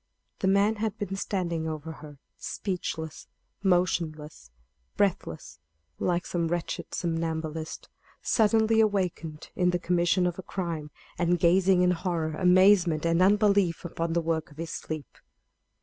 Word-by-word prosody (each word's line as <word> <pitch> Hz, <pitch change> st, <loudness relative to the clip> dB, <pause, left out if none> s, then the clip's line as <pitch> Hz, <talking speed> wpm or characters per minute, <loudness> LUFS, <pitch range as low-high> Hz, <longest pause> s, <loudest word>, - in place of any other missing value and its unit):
The 190 Hz, -, 0 dB
man 200 Hz, +3 st, +3 dB
had 215 Hz, 0 st, -2 dB
been 195 Hz, -1 st, -3 dB
standing 170 Hz, -5 st, -2 dB
over 155 Hz, 0 st, -5 dB
her, 150 Hz, -2 st, -11 dB, 0.2 s
speechless, 160 Hz, -5 st, -5 dB, 0.3 s
motionless, 165 Hz, -, 0 dB, 0.5 s
breathless, 165 Hz, -, -1 dB, 0.4 s
like 175 Hz, -1 st, 0 dB
some 170 Hz, -2 st, -1 dB
wretched 175 Hz, 0 st, -3 dB
somnambulist, 160 Hz, -2 st, -3 dB, 0.3 s
suddenly 220 Hz, 0 st, +3 dB
awakened 180 Hz, -7 st, -1 dB
in 180 Hz, -1 st, +2 dB
the 180 Hz, -, +1 dB
commission 175 Hz, +1 st, +2 dB
of 175 Hz, 0 st, -2 dB
a -, -, -3 dB
crime, 170 Hz, -5 st, -4 dB, 0.3 s
and 175 Hz, 0 st, +2 dB
gazing 180 Hz, +1 st, +4 dB
in 180 Hz, -, +4 dB
horror, 170 Hz, -3 st, -1 dB
amazement, 180 Hz, -2 st, +4 dB
and 165 Hz, +1 st, +2 dB
unbelief 200 Hz, -3 st, +3 dB
upon 165 Hz, -1 st, -2 dB
the 170 Hz, -, +2 dB
work 160 Hz, 0 st, -1 dB
of 145 Hz, -, -18 dB
his 165 Hz, 0 st, -5 dB
sleep. 155 Hz, -3 st, -6 dB
175 Hz, 135 wpm, -27 LUFS, 160-190 Hz, 0.5 s, gazing